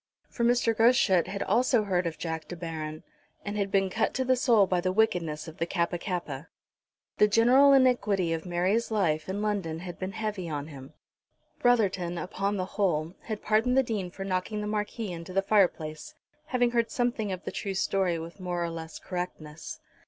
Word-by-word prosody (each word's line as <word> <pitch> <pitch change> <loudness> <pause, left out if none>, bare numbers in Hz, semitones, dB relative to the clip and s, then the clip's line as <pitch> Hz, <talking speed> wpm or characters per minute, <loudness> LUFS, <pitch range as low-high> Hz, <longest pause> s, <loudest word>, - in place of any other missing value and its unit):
For 235 - -3
Mr. 235 -1 +3
Groschut 220 -6 +4
had 200 +1 -3
also 245 -2 +3
heard 180 -3 0
of 160 - -5
Jack 160 -1 -4
De 175 - -6
Baron, 160 -2 -6 0.4
and 205 0 -3
had 200 -1 -1
been 195 -1 +1
cut 220 +2 0
to 260 - 0
the 255 0 +4
soul 235 -5 +4
by 180 -1 0
the 185 +1 0
wickedness 175 -7 0
of 160 - -10
the 165 - 0
Kappa 175 -1 -1
kappa. 180 -2 -4 0.7
The 210 - +7
general 245 +6 +6
iniquity 230 -10 +3
of 160 - -3
Mary's 185 +6 0
life 170 -7 0
in 200 +2 -2
London 195 -7 -1
had 175 -1 -8
been 190 +1 -4
heavy 215 -5 -3
on 145 0 -4
him. 135 0 -11 0.7
Brotherton, 195 -8 +2
upon 195 +3 -2
the 185 - -1
whole, 175 -5 -1
had 215 -2 -5
pardoned 225 +4 +2
the 265 - +5
Dean 210 -7 -3
for 195 +2 -7
knocking 195 +3 -2
the - - -3
Marquis 210 0 -3
into 170 +1 -7
the 195 +1 +2
fireplace, 175 -7 +1 0.3
having 245 -4 +2
heard 235 -1 +1
something 240 -4 -1
of 185 0 -5
the - - -4
true 195 -1 -4
story 190 -2 +1
with 165 +4 -8
more 175 -1 -2
or 170 - -2
less 160 -1 -7
correctness. 160 -4 -6
190 Hz, 190 wpm, -28 LUFS, 170-220 Hz, 0.7 s, The